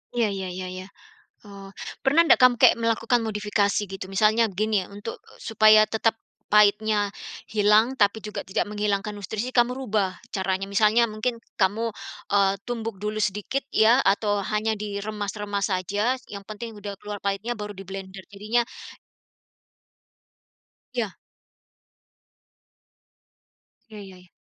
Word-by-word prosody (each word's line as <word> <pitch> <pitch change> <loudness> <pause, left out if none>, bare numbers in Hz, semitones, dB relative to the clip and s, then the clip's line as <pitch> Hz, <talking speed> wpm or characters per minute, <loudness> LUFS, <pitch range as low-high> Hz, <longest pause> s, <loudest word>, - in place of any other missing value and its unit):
Iya, 235 -2 +2
iya, 190 -1 -4
iya, 185 0 -5
iya. 185 0 -7 0.6
Oh, 200 -1 -11 0.4
pernah 285 +4 +5
ndak 335 - +5
kamu 255 -1 +7 0.2
melakukan 230 +1 +1
modifikasi 210 -1 0
gitu? 195 -1 -6
Misalnya 215 +4 +3
gini, 210 -3 +1
untuk, 205 +3 -8 0.3
supaya 215 0 +6
tetap 225 0 +2 0.4
pahitnya 210 0 +4 0.4
hilang, 215 +4 +3
tapi 205 +1 +3
juga 210 -1 -6
tidak 195 +2 -1
menghilangkan 210 -1 -1
nutrisi, 215 +4 -4
kamu 240 0 +4
rubah 210 -7 -1 0.2
caranya. 190 0 -2
Misalnya, 215 +3 +4
mungkin 215 +3 -2 0.2
kamu, 215 +4 +1 0.4
eee, 195 -1 +3
tumbuk 230 -2 -3
dulu 210 +1 -2
sedikit 210 +6 -1
ya, 225 +3 +5
atau 205 +1 +2
hanya 215 +1 +1
diremas-remas 205 0 -3
saja, 205 +6 0 0.2
yang 200 -1 -8
penting 215 +2 -7
sudah 205 0 -6
keluar 205 0 -6
pahitnya, 200 +4 -2
baru 210 0 -5
diblender. 195 0 -8
Jadinya 215 +4 0 2.3
Iya. 230 -6 -3 2.7
Iya 215 -1 -10
iya. 185 -2 -14
210 Hz, 120 wpm, -25 LUFS, 200-220 Hz, 2.7 s, kamu